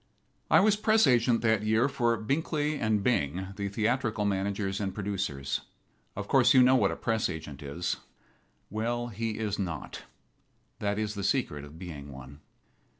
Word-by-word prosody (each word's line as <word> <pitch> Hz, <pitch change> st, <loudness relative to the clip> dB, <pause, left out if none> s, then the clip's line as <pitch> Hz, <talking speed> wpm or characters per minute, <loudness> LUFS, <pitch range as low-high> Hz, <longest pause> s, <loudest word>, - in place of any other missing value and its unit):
I -, -, +6 dB
was 210 Hz, +1 st, +4 dB
press 215 Hz, +1 st, +4 dB
agent 120 Hz, -1 st, +3 dB
that 110 Hz, -2 st, +2 dB
year 110 Hz, +4 st, +2 dB
for 120 Hz, -4 st, +1 dB
Binkly 150 Hz, +5 st, -1 dB, 0.2 s
& -, -, -6 dB
Bing, 95 Hz, -, 0 dB
the 100 Hz, 0 st, -3 dB
theatrical 110 Hz, 0 st, 0 dB
managers 100 Hz, 0 st, -1 dB
and 95 Hz, -2 st, -3 dB
producers. 95 Hz, -10 st, -2 dB, 0.5 s
Of 100 Hz, 0 st, -5 dB
course 130 Hz, -1 st, +5 dB
you 130 Hz, -, +8 dB
know 130 Hz, +1 st, +6 dB
what 130 Hz, -, +3 dB
a -, -, -3 dB
press 110 Hz, -2 st, 0 dB
agent 80 Hz, -4 st, -7 dB
is. 80 Hz, +5 st, -3 dB, 0.7 s
Well, 120 Hz, +3 st, -2 dB
he 115 Hz, 0 st, -3 dB
is 105 Hz, -2 st, -2 dB
not. 85 Hz, -5 st, -5 dB, 0.7 s
That 100 Hz, 0 st, -1 dB
is 105 Hz, -1 st, -1 dB
the 100 Hz, -1 st, -5 dB
secret 75 Hz, -5 st, 0 dB
of 75 Hz, +2 st, -11 dB
being 75 Hz, -6 st, -8 dB
one. 65 Hz, +2 st, -11 dB
105 Hz, 160 wpm, -29 LUFS, 95-120 Hz, 0.7 s, you